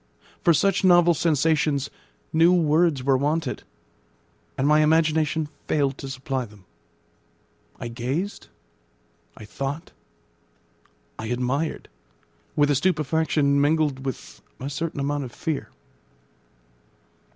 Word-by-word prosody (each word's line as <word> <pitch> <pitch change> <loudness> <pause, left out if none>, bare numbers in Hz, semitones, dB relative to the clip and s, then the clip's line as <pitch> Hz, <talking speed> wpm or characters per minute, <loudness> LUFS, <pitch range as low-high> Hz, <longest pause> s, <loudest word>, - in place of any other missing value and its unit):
For 175 - +5
such 195 +4 +2
novel 175 -2 +6
sensations, 150 -3 +1 0.4
new 165 +2 +5
words 160 -4 +2
were 135 0 +3
wanted; 145 0 -1 1.0
and 135 - +1
my 150 +1 +5
imagination 155 0 +2 0.2
failed 140 -2 0
to 135 - -6
supply 130 0 -3
them. 105 -3 -18 1.1
I - - -5
gazed, 130 - -4 0.9
I 110 - -10
thought, 140 +8 -5 1.3
I 110 - -4
admired, 125 +6 -2 0.7
with 145 0 +3
a - - +3
stupefaction 150 -3 +1
mingled 145 -2 +1
with 135 -2 -6 0.2
a 135 +2 -5
certain 155 +1 -3
amount 145 +1 -1
of 125 - -9
fear. 155 +2 -4
145 Hz, 105 wpm, -24 LUFS, 135-160 Hz, 1.3 s, novel